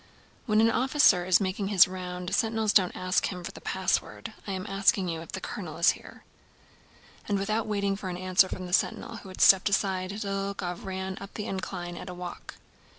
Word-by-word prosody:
"When 215 -1 +4
an 225 0 +4
officer 250 -9 +4
is 185 -1 +5
making 195 0 -2
his 195 -3 +6
round, 180 -1 -5
sentinels 220 -1 +1
don't 185 -3 +3
ask 185 +1 0
him 180 -2 -6
for - - -5
the - - -12
password.... - - -2
I - - -3
am 190 0 -4
asking 195 -2 +2
you 165 -1 -3
if 165 - -11
the - - -3
colonel - - -6
is - - +5
here." - - -12 1.0
And 205 - +1
without 215 +3 -1
waiting 200 -2 0
for 195 -1 -6
an 175 - -4
answer 185 +1 +3
from 185 - -5
the 180 - -7
sentinel, 225 +4 0
who 195 - -11
had 185 - -7
stepped 190 +1 +7
aside, 190 -2 0
Dólokhov 195 -3 -4
rode 190 0 -5
up 195 - -10
the 210 - -4
incline 180 -2 -5
at 180 - -8
a 180 - -7
walk. 180 0 -8
190 Hz, 205 wpm, -28 LUFS, 180-200 Hz, 1.0 s, stepped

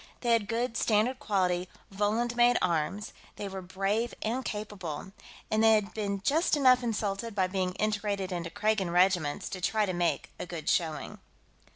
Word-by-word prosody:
They 240 - +1
had 225 -3 +3
good, 235 +2 -1
standard 230 +5 +2
quality, 185 -7 0 0.2
Volund 220 +4 0
made 240 0 +5
arms; 175 +4 -1 0.2
they 205 - -5
were 190 -1 -6
brave 195 +6 -1
and 240 +4 -1
capable; 195 -7 -5 0.4
and 215 +1 +3
they 225 0 +7
had 210 -1 +1
been 200 -2 -2
just 310 - +2
enough 255 -3 +5
insulted 220 -1 -2
by 190 -2 +3
being 185 -1 -1
integrated 205 -2 -1
into 170 -2 -3
Kragan 210 0 0
regiments 175 -4 +2
to 185 - -6
try 215 +4 +2
to 185 - -2
make 175 -1 -1
a - - -5
good 170 -2 -7
showing. 160 -4 -1
205 Hz, 170 wpm, -29 LUFS, 185-225 Hz, 0.4 s, they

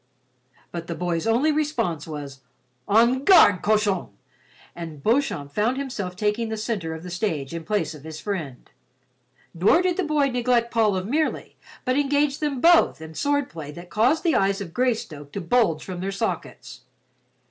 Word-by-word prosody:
But 170 -1 -6
the 170 - -4
boy's 175 +1 -2
only 250 +8 +3
response 290 - -1
was, 145 -3 -7 0.5
"En 235 +5 +4
garde, 315 - +6
cochon," 210 -3 +1 0.7
and 160 -4 -8
Beauchamp 220 - 0
found 225 - +1
himself 210 -10 -4
taking 210 +3 -1
the 220 - -3
center 200 -7 -3
of 160 - -9
the 180 - -8
stage 165 -7 -2
in 165 - -4
the 160 - -18
place 195 -6 0
of 150 -2 -12
his 155 0 -8
friend. 160 -11 -5 0.8
Nor 200 - +3
did 360 -1 0
the 380 - +1
boy 300 -3 +1
neglect 240 -1 +1
Paul 220 -3 +2
of 185 0 -2
Merely, 305 +8 -1 0.3
but 255 +2 +2
engaged 285 0 +1
them 295 -4 -2
both 335 - +5
in 160 0 -9
swordplay 255 - -2
that 175 +2 -11
caused 250 +9 +2
the 335 -3 +2
eyes 195 0 +2
of 180 -5 -7
Greystoke 215 - -2
to - - -3
bulge 180 -4 +1
from 185 -2 -6
their 195 +2 -3
sockets. 200 +3 -5
210 Hz, 170 wpm, -24 LUFS, 170-255 Hz, 0.8 s, garde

